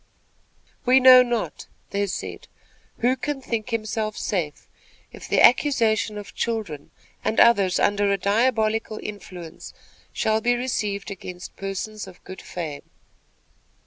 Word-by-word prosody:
"We 255 +1 +5
know 255 -1 +9
not," 240 -2 -2 0.2
they 200 0 0
said, - - -6 0.5
"who 250 +2 +3
can 285 +2 -3
think 230 -3 -3
himself 215 -1 -2
safe, 170 -7 -3 0.4
if - - -10
the - - +2
accusation 230 -5 +4
of 205 -1 -9
children 215 -11 -3 0.3
and 220 - 0
others 200 -6 +5
under 205 0 +2
a 200 - +2
diabolical 220 +1 +1
influence 180 -5 -9 0.4
shall 220 0 0
be 245 +1 +2
received 210 -5 -2
against 180 -2 -8
persons 195 +2 -5
of 180 - -14
good 190 - -9
fame." 155 -5 -7
215 Hz, 125 wpm, -24 LUFS, 195-235 Hz, 0.5 s, know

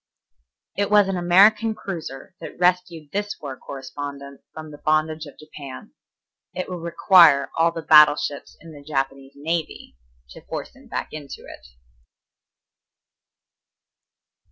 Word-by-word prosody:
It 200 0 -1
was 205 -1 +5
an 195 - -2
American 200 +6 +4
cruiser 170 -5 -7
that - - -9
rescued 175 -4 0
this 205 +1 -3
war 140 -3 -7
correspondent 140 +1 -8
from 155 -1 -10
the 145 - -12
bondage 155 0 0
of 145 - -14
Japan. 140 - -11 0.6
It 185 - -4
will 180 -1 -6
require 170 -3 +5
all 165 +1 +3
the 165 -1 -7
battle 150 -2 +7
ships 145 -1 -6
in 165 - -13
the 145 - -12
Japanese 135 -1 -4
navy 160 - -4 0.4
to - - -12
force - - -7
him - - -18
back - - -5
to - - -6
it. 140 - -12
155 Hz, 130 wpm, -22 LUFS, 140-180 Hz, 0.6 s, battle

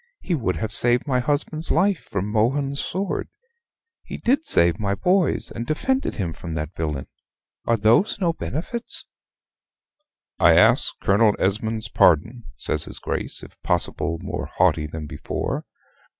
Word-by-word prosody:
He 180 - -3
would 115 - 0
have 105 +6 -3
saved 120 +3 +3
my 130 -4 +1
husband's 150 +4 -1
life 195 -3 +2
from 100 -1 -2
Mohun's 135 +6 0
sword. 190 +2 -3 0.7
He - - -7
did 275 +6 +1
save 85 +4 +3
my 100 -2 0
boy's, 180 - +1
and 115 - -4
defended 265 - 0
him 90 -6 -3
from 85 -2 -7
that 80 +1 -4
villain. 75 -4 -3 0.6
Are 115 - +3
those 115 - +3
no 170 -4 +1
benefits?" 185 - -5 1.3
"I - - +6
ask - - +5
Colonel 105 +2 +4
Esmond's 110 +3 -1
pardon," 110 - +3
says - - -2
his - - -9
Grace, - - -3
if - - -14
possible 85 -1 +1
more 95 - -4
haughty 75 -1 +1
than 75 0 -6
before. - - -4
115 Hz, 145 wpm, -23 LUFS, -, 1.3 s, I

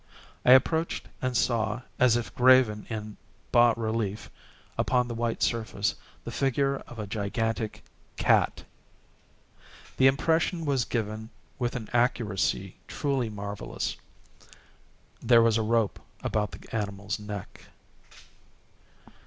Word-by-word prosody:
I 125 - +8
approached 160 +5 +2
and 130 -2 0
saw, 110 0 0 0.2
as 125 -2 +5
if 120 - -5
graven 125 -4 +4
in 110 -2 -5 0.3
bas 120 -1 +5
relief 110 -2 -2 0.4
upon 125 -1 +1
the 120 - -4
white 115 0 -1
surface, 110 -3 0 0.3
the - - -6
figure 135 0 +1
of 120 - -11
a 105 - -4
gigantic 110 +2 -2 0.3
cat. - - +2 1.3
The 130 - +6
impression 160 +5 +1
was 135 -5 +1
given 110 -1 -3 0.3
with 120 +1 -1
an 115 -3 -4
accuracy 105 -5 0
truly 135 -5 -1
marvellous. 100 -1 -4 1.3
There 115 -2 +6
was 115 -1 +3
a - - +1
rope 110 -1 +1 0.2
about 105 -1 0
the - - -10
animal's 100 -1 -3
neck. 105 -2 -8
115 Hz, 115 wpm, -28 LUFS, 105-125 Hz, 1.3 s, I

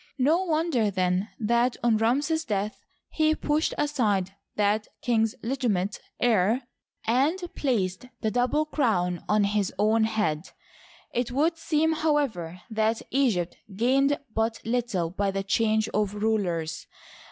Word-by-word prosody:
No 315 +8 +3
wonder, 310 - +1
then, 185 +1 0
that 235 +3 +2
on 235 -2 +4
Ramses's 285 +8 +1
death 210 -4 -2 0.3
he 310 0 +2
pushed 305 +1 0
aside 215 -11 +1 0.2
that 210 +1 +1 0.2
king's 225 -3 +2
legiti 255 +1 -1
mate 195 0 -1 0.2
heir 230 +1 +2 0.4
and 270 +10 +2 0.2
placed 215 -5 -1
the 220 - 0
double 250 +6 +1
crown 190 - 0
on 210 0 +4
his 200 -1 +1
own 220 +2 +3
head.. 200 -8 -1 0.6
It 245 -1 0
would 310 +6 +2
seem, 320 -1 +1
however, 275 - -1
that 220 +1 0
Egypt 225 -11 +1 0.2
gained 270 +6 +3 0.2
but 225 0 0
little 225 -8 -1
by 200 +2 0
the 195 0 -2
change 215 +2 +2
of 210 -1 -1
rulers. 195 -7 -1
225 Hz, 130 wpm, -26 LUFS, 200-270 Hz, 0.6 s, on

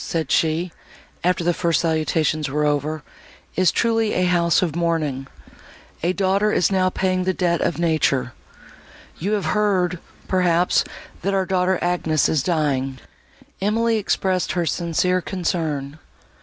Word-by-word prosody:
"Our - - -6
house," - - -8
said 160 -4 -2
she, 165 +2 +1 0.5
after 180 0 +1
the 175 +1 +2
first 170 -2 +1
salutations 155 -2 0
were 150 +2 0
over, 150 +1 -1 0.5
"is 185 -2 +3
truly 225 -2 +1
a 180 - +2
house 175 -1 +3
of 165 -4 -2
mourning—a 165 +1 -4
daughter 200 +2 +1
is 190 - +2
now 185 -1 +2
paying 185 0 0
the 185 0 0
debt 170 -2 +1
of - - 0
nature.—You 160 - -3
have 205 -4 -1
heard, 185 -5 +1 0.3
perhaps, 180 -1 +2 0.4
that 195 +2 0
our 190 -1 +1
daughter 185 0 +1
Agnes 165 -4 +1
is 155 - +1
dying?" 135 -5 0 0.6
Emily 225 +3 +1
expressed 190 -3 0
her 175 -2 0
sincere 175 +3 0
concern. 160 -6 -3
175 Hz, 140 wpm, -22 LUFS, 155-185 Hz, 0.6 s, is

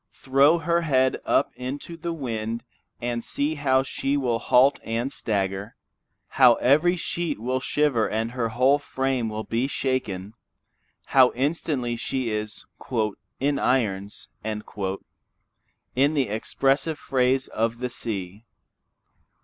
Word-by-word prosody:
Throw 140 +5 +4
her 170 +1 +1
head 130 -5 +2
up - - +2
into 135 +6 -6
the 170 +1 -4
wind 115 -6 -3 0.4
and 120 -1 -2
see 145 +2 0
how 135 -3 +2
she 135 +1 -1
will 120 -4 0
halt 125 +4 +4
and 120 +5 -2
stagger, 100 -1 -1 0.5
how 125 -3 +6
every 155 +10 +3
sheet 170 - -2
will 130 +3 -1
shiver 135 -4 +1
and 110 +2 -1
her 120 -2 -1
whole 130 +5 +3
frame 130 -4 -1 0.2
be 120 +3 0
shaken, 110 -8 -2 0.7
how 130 -2 +5
instantly 135 -3 -1
she 125 0 -2
is 105 0 -3 0.7
"in 140 +1 +1
irons," 105 -7 0 0.2
in 105 0 -3 1.5
the 135 -6 +1
expressive 135 +8 0
phrase 130 -1 +1
of 115 +1 -1
the 125 +1 -3
sea. 100 -3 -5
130 Hz, 120 wpm, -25 LUFS, 115-140 Hz, 1.5 s, how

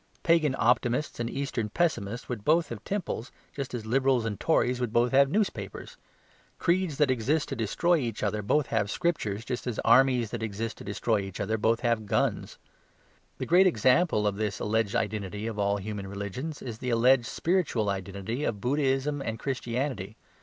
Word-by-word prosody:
Pagan 165 -6 +3
optimists 120 +5 +1
and 120 0 -1
Eastern 125 -6 -3
pessimists 120 -7 -1
would 115 -5 -5
both 160 +3 +3
have 115 -3 -7
temples, 175 - -3 0.2
just 135 -3 -4
as 115 -3 -5
Liberals 130 0 +2
and 105 -3 -3
Tories 125 -6 +2
would 120 -3 -1
both 120 +2 +2
have 135 0 +5
newspapers. 215 - -2 0.6
Creeds 175 -4 +1
that 150 -3 +3
exist 140 +6 0
to 135 - -3
destroy 150 - +1
each 120 -7 -3
other 105 - 0
both 145 +8 +2
have 105 - 0
scriptures, 115 - -1
just 125 -1 -4
as 120 - -2
armies 125 -4 +4
that 120 - -4
exist 110 +1 -4
to - - -8
destroy 105 +2 0
each 95 -1 -6
other 110 +2 0
both 115 +2 +1
have 115 -3 0
guns. - - 0 0.8
The - - -3
great 185 +3 +5
example 130 - +3
of 100 -1 0
this 105 -3 -2
alleged 110 +1 0
identity 105 -2 -2
of 110 -2 -4
all 100 0 +1
human 100 -1 -5
religions 100 +10 -5
is 115 -3 -6
the 125 - -3
alleged 120 +1 +4
spiritual 165 - 0
identity 100 +6 -3
of 105 -8 -1
Buddhism 135 +3 0
and 110 -4 -3
Christianity. 125 -4 -3
120 Hz, 175 wpm, -28 LUFS, 105-140 Hz, 0.8 s, have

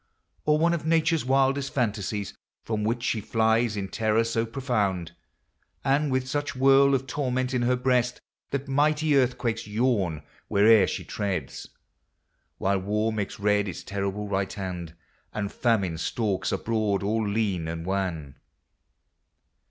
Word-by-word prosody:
Or 150 0 +4
one 170 +2 +3
of 170 - -2
Nature's 160 0 +2
wildest 135 +1 +1
fantasies, 105 -4 -2 0.3
From 110 -2 -2
which 115 +2 -1
she 110 - 0
flies 110 0 +1
in 100 -1 -2
terror 110 -1 +1
so 115 0 -1
profound, 105 - -1 0.7
And 140 +1 +2
with 130 0 0
such 145 +1 -2
whirl 135 +1 +5
of 135 0 -2
torment 130 -1 -1
in 125 - +1
her 125 +1 +2
breast, 125 -1 +1 0.3
That 140 0 -3
mighty 150 +2 +2
earthquakes 120 -4 0
yawn 105 - 0 0.2
where'er 105 0 +5
she - - -3
treads; 95 -9 -4 0.9
While 100 0 +1
War 105 +3 0
makes 105 -2 -4
red 105 0 +2
its 90 - -6
terrible 100 +1 -3
right 95 -1 -1
hand, 90 -4 -6 0.4
And 100 -2 -2
Famine 100 -9 0
stalks 100 -1 -1
abroad 110 -4 0
all 110 +1 0
lean 100 -6 -1
and 80 0 -5
wan 90 -8 -3
110 Hz, 140 wpm, -26 LUFS, 100-130 Hz, 0.9 s, whirl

